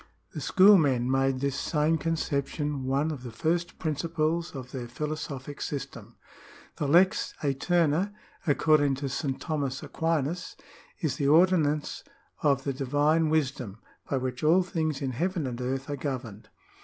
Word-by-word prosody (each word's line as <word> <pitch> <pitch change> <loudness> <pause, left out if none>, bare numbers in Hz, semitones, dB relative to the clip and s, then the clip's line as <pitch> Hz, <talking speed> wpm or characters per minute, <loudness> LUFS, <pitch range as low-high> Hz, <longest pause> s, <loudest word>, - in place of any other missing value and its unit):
^ - - -22 0.3
The - - -5
schoolmen 150 -11 +5
made 135 0 +2
this 140 -1 0
same 155 +1 +1
conception 145 -2 -2
one 140 +4 +1
ol 150 - -5
the 125 -1 -8
first 170 +8 -1
principles 165 +1 -1
of 130 -2 -7
their 125 -3 -5
philosophic 145 +1 -5
system. 140 -2 -6 0.6
The 145 - -1
lex 180 +6 +3
azterna, 165 +5 +1 0.4
according 145 -1 +3
to 140 +1 -4
St. 135 0 -2
Thomas 145 -5 -3
Aquinas, 165 +1 -2 0.5
is 145 -6 -1
the 140 - 0
ordinance 155 -2 +3 0.4
of 140 -2 +2
the 140 - -1
divine 145 +4 +2
wisdom, 130 -9 -1 0.3
by 135 - +1
which 130 0 -4
all 170 +5 +5
things 155 -5 -2
in 135 - -1
heaven 170 - -1
and 125 -1 -4
earth 130 +2 -2
are 145 - -2
governed. 130 -7 -5
145 Hz, 145 wpm, -28 LUFS, 135-160 Hz, 0.6 s, schoolmen